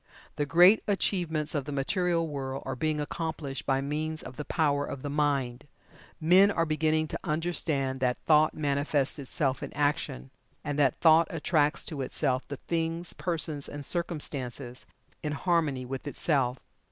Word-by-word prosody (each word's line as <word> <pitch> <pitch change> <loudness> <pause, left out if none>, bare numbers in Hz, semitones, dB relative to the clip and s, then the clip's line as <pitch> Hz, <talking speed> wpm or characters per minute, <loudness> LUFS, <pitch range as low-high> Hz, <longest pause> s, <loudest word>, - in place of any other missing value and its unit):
The 145 - -1
great 180 +7 +7
achievements 170 -6 0
of 145 -4 -1
the 145 - -5
material 165 +4 0
world 135 -2 -4
are 135 - -3
being 155 +3 -1
accomplished 150 -2 -4
by 135 0 +2
means 155 +3 -3
of 130 - -9
the 150 - -5
Power 145 -3 +1
of 140 -2 -6
the 145 - -3
Mind. 140 -3 0 0.5
Men 185 +5 +6
are 165 -5 +1
beginning 155 0 +1
to - - -4
understand 155 -5 -1
that 125 -1 +1
"Thought 155 0 +4
manifests 145 0 0
itself 135 0 -1
in - - -5
Action," 145 - -1 0.3
and 145 0 -2
that 140 -4 +4
Thought 160 0 +5
attracts 155 -1 +1
to 150 -4 -3
itself 130 0 -1
the 140 - -5
things, 165 +2 -2
persons 155 -2 -2
and 145 -1 -7
circumstances 140 -7 -3 0.3
in 150 -1 -2
harmony 150 -5 0
with 135 +3 -6
itself. 135 -4 +1
150 Hz, 155 wpm, -29 LUFS, 135-160 Hz, 0.5 s, great